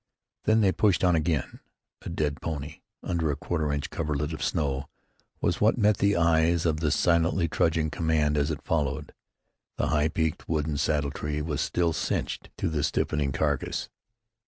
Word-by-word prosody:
Then 110 +1 +4
they 100 -3 +4
pushed 100 -2 +2
on 90 -2 +4
again. 80 -2 -1 0.4
A - - -7
dead 75 -3 -2
pony, 75 -1 -5 0.2
under 85 -3 0
a 75 - 0
quarter 75 0 -2
inch 70 0 -3
coverlet 75 0 -2
of 80 - -6
snow, 70 -4 -1 0.5
was 85 - 0
what 110 +4 +4
met 105 -2 +3
the 100 0 +2
eyes 85 0 +3
of 80 -2 +1
the 80 -1 +1
silently 85 +2 +2
trudging 80 0 +1
command 80 -2 +1
as 70 +1 +1
it 75 -2 -4
followed. 75 -4 -1 0.6
The - - 0
high 75 0 +2
peaked 80 0 -2
wooden 75 -2 0
saddle 75 -1 0
tree 75 +1 -3
was 75 -3 -2
still 85 -2 +1
"cinched" - - -2
to - - -1
the 80 -2 -1
stiffening 75 -1 0
carcass. - - -1
80 Hz, 170 wpm, -27 LUFS, 75-85 Hz, 0.6 s, Then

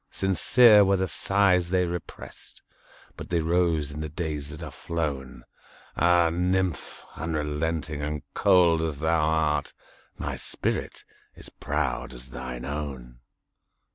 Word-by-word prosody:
Sincere 105 +4 +5
were 100 0 +3
the 95 0 0
sighs 95 -2 +2
they 90 0 +2
represt, 85 -1 -8 0.5
But - - -9
they 85 - +1
rose 80 -3 +1
in 75 - -7
the 75 0 -4
days 75 -3 -4
that 75 0 -8
are - - -7
flown! 70 -7 -4 0.5
Ah, 85 -1 +4
nymph! 90 -1 -1
unrelenting 80 -1 -2
and 75 0 -3
cold 90 -5 +4
as 80 -3 -2
thou 80 +2 +1
art, 75 -1 +1 0.4
My - - -4
spirit - - -3 0.3
is - - -11
proud 70 -4 -3
as - - -9
thine 65 0 -6
own! 65 -4 -6
80 Hz, 130 wpm, -26 LUFS, 75-90 Hz, 0.5 s, Sincere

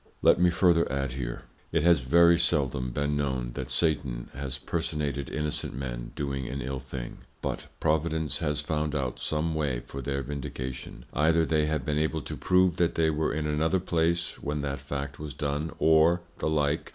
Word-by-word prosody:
Let - - +6
me 90 0 +5
further 85 -3 +3
add 70 -1 -1
here; 60 -3 -4 0.3
It 80 -2 +2
has 85 -2 +6
very 85 +6 +5
seldom 70 -6 +1
been 75 +3 -1
known, 65 -4 -1
that - - -5
Satan 70 -7 0
has 70 -1 -4
Personated 75 -3 -2
innocent 75 -4 -2
Men - - -5
doing 70 -3 -2
an 70 +2 -4
ill 65 +1 -3
thing, 65 -2 -7 0.2
but - - -3
Providence 80 0 +1
has 75 -3 0
found 75 0 -1
out 65 -4 -2
some 80 +1 -1
way 70 -6 0
for 70 - -6
their 70 +1 -2
Vindication; 65 -1 -6
either 80 +2 +3
they 75 -2 +2
have 75 -4 -1
been 75 0 +1
able 80 0 0
to - - -5
prove 90 -1 +3
that 85 -1 +2
they 80 -1 +3
were 75 +1 0
in 75 0 -2
another 80 +4 +1
place 85 -1 0
when 75 +1 -2
that 70 -2 -3
Fact 70 0 -5
was 75 -2 -6
done, 75 +2 -1
or 80 +2 +5 0.2
the - - 0
like. 75 0 +1
75 Hz, 185 wpm, -28 LUFS, 70-80 Hz, 0.3 s, Let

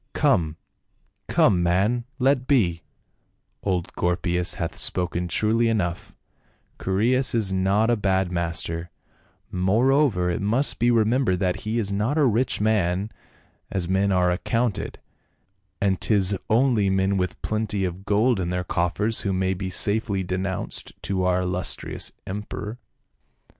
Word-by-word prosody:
" - - -48
Come, 85 - +2 0.7
come, 90 -3 +3
man, 100 +8 +1
let 130 -1 +2
be; 90 - +2 0.8
old 90 -3 -2
Gorpius 90 0 0
hath 85 - -4
spoken 90 -1 0
truly 110 +6 +2
enough, 100 -1 -2 0.7
Chaereas 120 +7 +1
is 105 -4 +1
not 100 +5 +2
a - - +4
bad 95 -3 0
master, 85 0 -2 0.6
moreover 105 0 +2
it 85 - -2
must 115 +8 +1
be 120 - +3
remembered 115 -3 +2
that 90 -2 +1
he 110 +2 0
is 100 -4 -1
not 105 +9 0
a 150 - +4
rich 120 +1 +1
man 105 -1 +1 0.6
as 90 -3 -2
men 95 +2 +1
are 90 -1 +3
accounted; 115 +4 -1 0.8
and 95 -2 0
'tis 100 -2 +2
only 115 -3 +3
men 95 +1 +1
with 90 -2 -2
plenty 110 -2 -1
of 90 +1 -5
gold 105 +3 +2
in 90 -2 -2
their 90 0 -1
coffers 95 +6 0
who 100 - -1
may 95 0 0
be 95 0 -4
safely 100 +1 +1
denounced 95 +1 -4
to 95 -2 -1
our 90 0 +2
illustrious 90 -1 -2
emperor." 105 +3 -6
95 Hz, 135 wpm, -24 LUFS, 90-110 Hz, 0.8 s, a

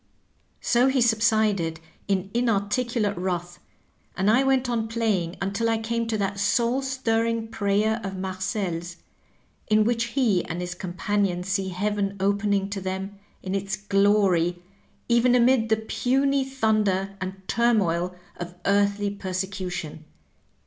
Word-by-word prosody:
^^ - - -41 0.6
So 245 +2 +3
he 265 0 +2
subsided 215 -7 +2 0.3
in 195 -1 -1
inarticulate 230 -1 0
wrath, 175 -1 -3 0.6
and 195 +3 +3
I 250 +4 +4
went 265 -1 +2
on 230 -2 -1
playing 215 -7 -1
until 200 +4 -1
I 225 - +2
came 230 +1 -2
to 225 -1 -1
that 200 -1 -2
soul 235 +5 +2
stirring 230 -4 -1
prayer 215 +2 +1
of 195 -1 -4
MarcePs 185 -2 -3 0.7
in 215 0 +4
which 230 +1 +1
he 225 -10 +2
and 170 - -4
his 180 0 -4
companion 185 0 -1
see 190 0 -1
heaven 200 +1 -1
opening 200 0 +1
to 200 -1 -3
them 190 +2 -4 0.2
in 185 - -3
its 195 0 -1
glory, 195 -3 +2 0.5
even 240 +1 +4
amid 240 -2 +4
the 220 - +3
puny 270 +5 +1
thun 220 -5 +1
der 195 0 -1
and 185 +1 -3
turmoil 185 -7 +1 0.2
of 175 0 -7
earthly 200 0 +2
persecution. 185 -5 -4
205 Hz, 135 wpm, -25 LUFS, 190-230 Hz, 0.7 s, I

